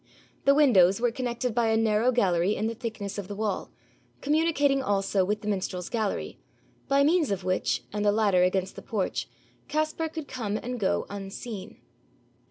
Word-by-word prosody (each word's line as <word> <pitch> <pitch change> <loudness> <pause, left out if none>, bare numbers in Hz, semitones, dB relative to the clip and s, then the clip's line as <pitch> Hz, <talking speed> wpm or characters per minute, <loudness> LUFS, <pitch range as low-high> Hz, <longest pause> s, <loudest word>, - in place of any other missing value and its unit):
The 275 - +6
windows 200 -10 +5
were 240 0 +2
connected 245 0 -2
by 235 0 +2
a 220 0 +3
narrow 225 +2 +3
gallery 190 -5 +2
in 215 - -2
the 225 - -1
thickness 220 -4 -5
of 195 - -6
the 205 - -6
wall, 210 -1 -2 0.5
communicating 290 -2 +2
also 195 -4 +1
with 210 +3 -1
the 210 - -7
minstrels' 185 -3 -2
gallery, 220 -4 -2 0.5
by 275 0 +4
means 320 +1 +3
of 195 -2 -2
which, 185 0 0
and 210 0 -1
a 205 - +4
ladder 205 -4 +3
against 185 +1 +1
the - - -8
porch, 205 -4 -2 0.4
Caspar 310 +2 -1
could 315 -2 -6
come 215 -5 -3
and 250 +1 -5
go 195 - 0
unseen. 200 +1 -7
220 Hz, 175 wpm, -27 LUFS, 195-255 Hz, 0.5 s, The